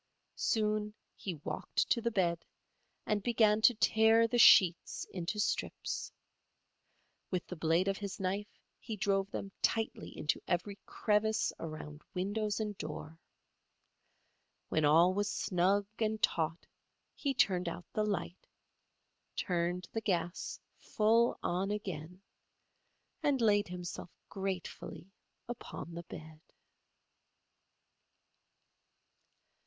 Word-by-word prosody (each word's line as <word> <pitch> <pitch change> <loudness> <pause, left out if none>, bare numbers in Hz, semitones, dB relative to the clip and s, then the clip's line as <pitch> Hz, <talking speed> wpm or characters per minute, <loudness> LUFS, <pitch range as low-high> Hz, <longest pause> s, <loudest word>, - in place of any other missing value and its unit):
Soon 210 -1 +1 0.2
he 185 -4 -5
walked - - -1
to 235 - +3
the 235 - +1
bed 175 -6 0 0.6
and 210 -1 0
began 220 -1 +3
to 240 +2 +6
tear 225 +1 +5
the 240 +1 0
sheets 180 -6 +6
into 185 +4 -3
strips. - - -2 1.2
With 180 -2 -2
the 180 - -7
blade 165 +3 +2
of 195 -1 0
his 200 -2 -5
knife 195 +2 -3 0.2
he 225 - -5
drove 195 0 +1
them 195 -1 -5
tightly 225 0 -1
into 150 - 0
every 195 +3 -1
crevice 215 0 +1
around 155 -2 -7
windows 205 +3 -1
and 210 -1 -2
door. 155 +1 -6 1.5
When 155 - +2
all 165 +5 +6
was 205 +1 0
snug 190 +3 +1
and 220 -1 0
taut 165 -4 0 0.5
he 275 -2 -2
turned 180 -6 +2
out 175 +1 -7
the 215 - +1
light, 200 -3 -3 0.9
turned 175 0 -1
the 225 - -1
gas 175 -4 -2 0.2
full 230 +2 +3
on 185 +3 0
again 185 -3 -5 1.0
and 290 -4 +2
laid 205 -3 +3
himself 180 -1 -6 0.2
gratefully 190 -1 -5 0.4
upon 230 -7 -7
the 170 0 -7
bed. 155 0 -10
195 Hz, 110 wpm, -33 LUFS, 175-215 Hz, 1.5 s, to